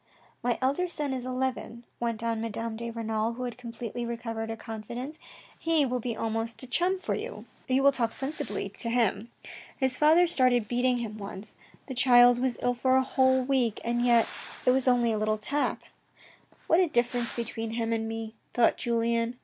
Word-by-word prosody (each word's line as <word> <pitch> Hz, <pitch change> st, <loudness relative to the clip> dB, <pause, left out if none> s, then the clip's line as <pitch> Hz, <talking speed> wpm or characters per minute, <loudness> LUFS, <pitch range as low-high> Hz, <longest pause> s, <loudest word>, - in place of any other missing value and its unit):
My 240 Hz, -1 st, 0 dB
elder 285 Hz, +8 st, +1 dB
son 300 Hz, -5 st, -3 dB
is 255 Hz, -1 st, -4 dB
eleven," 255 Hz, -2 st, -3 dB, 0.2 s
went 230 Hz, -1 st, -2 dB
on 230 Hz, -1 st, -1 dB
Madame 225 Hz, 0 st, -3 dB
de 235 Hz, +1 st, -5 dB
Renal, 225 Hz, 0 st, -2 dB
who 250 Hz, +2 st, -6 dB
had 245 Hz, -2 st, -4 dB
completely 235 Hz, 0 st, -6 dB
recovered 230 Hz, -1 st, -4 dB
her 225 Hz, -, -3 dB
confidence. 235 Hz, +6 st, -7 dB, 0.2 s
" -, -, -24 dB
He 320 Hz, -3 st, +4 dB
will 250 Hz, -1 st, -1 dB
be 235 Hz, -1 st, -4 dB
almost 225 Hz, +1 st, -3 dB
a -, -, -4 dB
chum 360 Hz, +8 st, +1 dB
for 370 Hz, -, -3 dB
you. -, -, -5 dB, 0.2 s
You 260 Hz, +1 st, +2 dB
will 280 Hz, -, +7 dB
talk 235 Hz, -4 st, 0 dB
sensibly 275 Hz, +5 st, -3 dB
to 230 Hz, -, -2 dB
him. 230 Hz, -1 st, +1 dB, 0.5 s
His 260 Hz, -2 st, +1 dB
father 320 Hz, +4 st, +6 dB
started 255 Hz, -8 st, +3 dB
beating 245 Hz, +2 st, +1 dB
him 215 Hz, -3 st, -5 dB
once. 200 Hz, +1 st, -8 dB, 0.3 s
The 265 Hz, -, -6 dB
child 245 Hz, -1 st, +6 dB
was 255 Hz, -1 st, 0 dB
ill 245 Hz, -, +2 dB
for 260 Hz, +2 st, +2 dB
a 260 Hz, -, +3 dB
whole 260 Hz, 0 st, +3 dB
week, 250 Hz, -4 st, +1 dB
and 240 Hz, +1 st, 0 dB
yet 235 Hz, -2 st, +4 dB, 0.4 s
it 250 Hz, -, +6 dB
was 260 Hz, 0 st, +2 dB
only 240 Hz, -2 st, +4 dB
a 215 Hz, -, 0 dB
little 215 Hz, 0 st, +1 dB
tap." 285 Hz, +7 st, -1 dB, 0.8 s
What 330 Hz, -, +4 dB
a 370 Hz, -, +4 dB
difference 240 Hz, -4 st, 0 dB
between 225 Hz, -1 st, -4 dB
him 230 Hz, 0 st, -1 dB
and 225 Hz, 0 st, -1 dB
me, 225 Hz, 0 st, -5 dB, 0.2 s
thought 240 Hz, -, +4 dB
Julien. 235 Hz, 0 st, 0 dB
240 Hz, 190 wpm, -28 LUFS, 230-260 Hz, 0.8 s, will